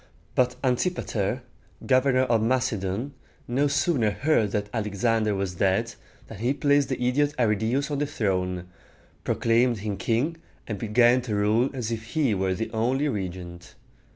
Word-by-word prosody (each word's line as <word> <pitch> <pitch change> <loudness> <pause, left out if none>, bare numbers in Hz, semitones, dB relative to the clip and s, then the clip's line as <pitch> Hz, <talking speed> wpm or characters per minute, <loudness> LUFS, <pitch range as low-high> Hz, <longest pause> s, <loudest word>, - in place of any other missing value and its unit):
But 125 0 +2
An 125 -2 +2
tip´a 180 +4 -1
ter, 110 +4 -2 0.4
governor 130 0 +3
of 120 -3 +2
Macedon, 115 0 -1 0.3
no 135 +4 +1
sooner 145 -5 +1
heard 115 -1 +1
that 105 0 -2
Alexander 110 0 0
was 95 -2 -2
dead, 100 +6 +1 0.3
than 110 - -10
he 125 +5 0
placed 145 -1 +2
the 130 - -2
idiot 145 +4 +1
Arridæus 120 +5 +1
on 145 - -1
the 145 - 0
throne, 90 -8 -1 0.6
proclaimed 120 +1 +2
him 105 -2 -2
king, 120 - 0 0.3
and 105 -3 -5
began 120 +3 +4
to 115 -4 -3
rule 110 +5 +2
as 125 -4 -4
if 110 -1 -3
he 145 -8 +2
were 95 -1 0
the 110 +3 -4
only 130 +6 0
regent. 90 -5 -6
115 Hz, 155 wpm, -26 LUFS, 105-130 Hz, 0.6 s, began